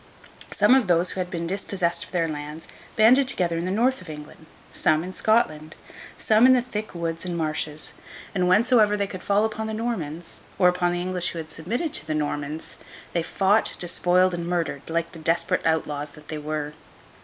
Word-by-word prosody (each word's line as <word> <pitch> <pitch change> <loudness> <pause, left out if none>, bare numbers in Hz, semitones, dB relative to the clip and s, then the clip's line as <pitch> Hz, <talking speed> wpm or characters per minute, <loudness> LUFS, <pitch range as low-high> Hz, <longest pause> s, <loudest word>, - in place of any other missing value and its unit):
Some - - +4
of 260 -6 +4
those 175 0 +2
who - - -5
had 180 -1 -2
been 170 -1 -3
dispossessed 180 -2 -2
of - - -18
their 170 -3 +1
lands, 150 +1 -6 0.3
banded 250 +5 +6
together 175 -9 0
in 170 - -3
the - - -2
North 240 +6 +1
of 180 - -12
England; 150 +1 -10 0.3
some, 155 +1 +2
in 185 +1 -6
Scotland; 155 -9 +1 0.4
some, 220 +3 +5
in 260 - +7
the 250 - +4
thick 215 -5 -5
woods 165 -1 -3
and 175 -2 -3
marshes; 155 -1 -3 0.4
and 180 -2 +1
whensoever 210 +2 +4
they 200 - 0
could 185 -2 -8
fall 205 +1 +2
upon 220 0 -3
the 220 - -3
Normans, 175 -8 -4 0.2
or 180 - +5
upon 180 0 +1
the 175 0 -2
English 180 -1 -1
who - - -7
had 160 -1 -6
submitted 230 - -3
to - - -1
the 155 - -1
Normans, 150 +1 -3 0.3
they 170 - +1
fought, 195 +5 +2
despoiled, 180 +1 +2
and 170 -1 -3
murdered, 170 -5 -1
like 165 0 -1
the 165 - -11
desperate 165 +2 0
outlaws 150 -2 -1
that 150 -1 -16
they 155 - -4
were. 150 0 -4
175 Hz, 200 wpm, -25 LUFS, 160-205 Hz, 0.4 s, in